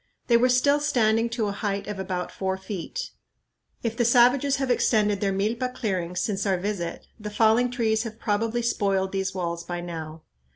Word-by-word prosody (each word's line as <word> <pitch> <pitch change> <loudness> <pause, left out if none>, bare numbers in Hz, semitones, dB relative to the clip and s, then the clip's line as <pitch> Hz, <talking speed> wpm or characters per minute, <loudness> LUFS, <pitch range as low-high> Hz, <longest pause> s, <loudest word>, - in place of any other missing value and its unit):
They 235 - +3
were 245 +2 +4
still 280 +4 +4
standing 230 -5 +2
to 230 -2 -1
a 205 - -1
height 200 0 -3
of 210 -1 -5
about 185 -2 -3
four 190 -1 -2
feet. 200 - -5 0.7
If 230 -1 -1
the 240 - +1
savages 250 +4 +4
have 270 -2 -1
extended 210 -4 +2
their 200 -1 +1
milpa 230 +6 -1
clearings 185 -6 -2
since 200 -3 -1
our 190 -1 +2
visit, 180 -3 -4
the 210 0 -5
falling 225 +3 +3
trees 225 -3 +1
have 225 -2 -6
probably 225 +2 -1
spoiled 195 -4 0
these 190 -1 -2
walls 170 -2 -3
by 175 0 -4
now. 160 -2 -7
210 Hz, 180 wpm, -25 LUFS, 190-235 Hz, 0.7 s, were